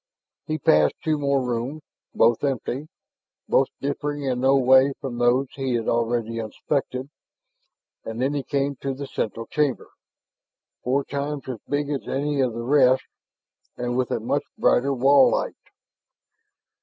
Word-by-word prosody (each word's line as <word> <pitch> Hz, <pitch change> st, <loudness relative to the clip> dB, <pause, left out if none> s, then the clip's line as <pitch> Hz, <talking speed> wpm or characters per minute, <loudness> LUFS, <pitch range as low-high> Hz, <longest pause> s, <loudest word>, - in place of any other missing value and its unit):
He 155 Hz, -1 st, -1 dB
passed 75 Hz, -, +3 dB
two 155 Hz, -2 st, 0 dB
more 140 Hz, -2 st, +1 dB
rooms, 125 Hz, +6 st, -3 dB, 0.3 s
both 115 Hz, +2 st, +3 dB
empty, 135 Hz, +1 st, -2 dB, 0.6 s
both 135 Hz, -, +3 dB
differing 145 Hz, +1 st, -3 dB
in 130 Hz, -2 st, -1 dB
no 135 Hz, +2 st, +4 dB
way 130 Hz, +1 st, +5 dB
from 130 Hz, -5 st, -5 dB
those 120 Hz, +3 st, +3 dB
he 135 Hz, -3 st, -2 dB
had 115 Hz, -1 st, -2 dB
already 115 Hz, -1 st, 0 dB
inspected; 130 Hz, +4 st, -3 dB, 0.9 s
and 110 Hz, +1 st, -6 dB
then 135 Hz, +3 st, +1 dB
he 145 Hz, -, -1 dB
came 140 Hz, 0 st, -1 dB
to 135 Hz, 0 st, -3 dB
the 140 Hz, +1 st, -6 dB
central 115 Hz, -3 st, -4 dB
chamber, 145 Hz, 0 st, -1 dB, 0.9 s
four 135 Hz, +3 st, +1 dB
times 140 Hz, 0 st, -4 dB
as 125 Hz, -4 st, -5 dB
big 145 Hz, 0 st, -1 dB
as 140 Hz, -, -3 dB
any 145 Hz, +1 st, 0 dB
of 125 Hz, -3 st, +1 dB
the 115 Hz, +1 st, -5 dB
rest 130 Hz, 0 st, +4 dB, 0.7 s
and 120 Hz, 0 st, -2 dB
with 125 Hz, -1 st, 0 dB
a -, -, -1 dB
much -, -, 0 dB, 0.2 s
brighter 135 Hz, +3 st, +3 dB
wall 135 Hz, +1 st, +5 dB
light. -, -, -1 dB
135 Hz, 150 wpm, -24 LUFS, 120-140 Hz, 0.9 s, way